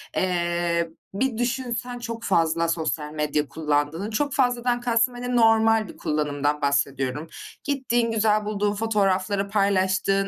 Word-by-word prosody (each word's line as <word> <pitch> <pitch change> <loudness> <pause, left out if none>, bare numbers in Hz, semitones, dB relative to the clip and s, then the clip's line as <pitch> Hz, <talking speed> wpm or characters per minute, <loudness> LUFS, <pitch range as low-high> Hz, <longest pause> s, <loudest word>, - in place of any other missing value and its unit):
eee, 170 -2 0 0.2
bir 230 +2 -1
düşünsen 245 0 -2
çok 230 -1 -6
fazla 165 -2 +2
sosyal 155 -2 -2
medya 150 -1 -1
kullandığını, 155 +6 -1
çok 285 +5 -1
fazladan 245 -2 +1
kastım 240 0 +2
hani 245 0 -3
normal 225 -2 +4
bir - - -12
kullanımdan 150 -1 -1
bahsediyorum. 140 +1 0 0.4
Gittiğin, 240 -5 0
güzel 215 -1 +2
bulduğun 205 -1 0
fotoğrafları 200 -2 0
paylaştığın, 195 -1 +1
200 Hz, 125 wpm, -24 LUFS, 165-230 Hz, 0.4 s, normal